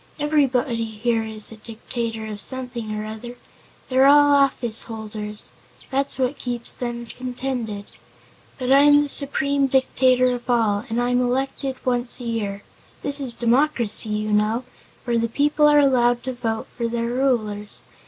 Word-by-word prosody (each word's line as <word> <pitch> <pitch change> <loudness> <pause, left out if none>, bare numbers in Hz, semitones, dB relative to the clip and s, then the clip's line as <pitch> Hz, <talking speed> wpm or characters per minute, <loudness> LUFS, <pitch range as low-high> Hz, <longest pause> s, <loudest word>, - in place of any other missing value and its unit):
"Everybody 270 -6 +1
here 225 +1 -1
is 220 -1 -2
a 225 - -10
dictator 225 0 -5
of 210 -1 -6
something 245 -3 -2
or 215 0 -4
other. 220 +3 -8 0.5
They're 260 +1 +4
all 290 0 +6
office 260 -5 +2
holders. 215 -2 -6 0.4
That's 275 +1 0
what 260 +1 -1
keeps 240 -1 0
them 240 -1 -4
contented. 245 -4 -5 0.7
But 255 -1 -2
I'm 290 +1 +6
the - - -3
Supreme 280 0 +2
Dictator 255 -1 +3
of 245 0 -7
all, 220 -3 +1
and 225 +2 -1
I'm 245 0 +2
elected 265 +2 -1
once 245 0 0
a - - -8
year. 205 -4 -3 0.4
This 285 0 +1
is 255 -4 -4
a - - -4
democracy, 235 -3 +2
you 215 0 -2
know, 215 +4 +1 0.4
where 235 -2 0
the 230 0 -1
people 295 +4 +2
are 295 0 +5
allowed 245 -4 +3
to 260 - -3
vote 225 -2 -3
for 235 -1 -2
their 230 0 -2
rulers. 235 -5 -1
245 Hz, 155 wpm, -22 LUFS, 225-265 Hz, 0.7 s, all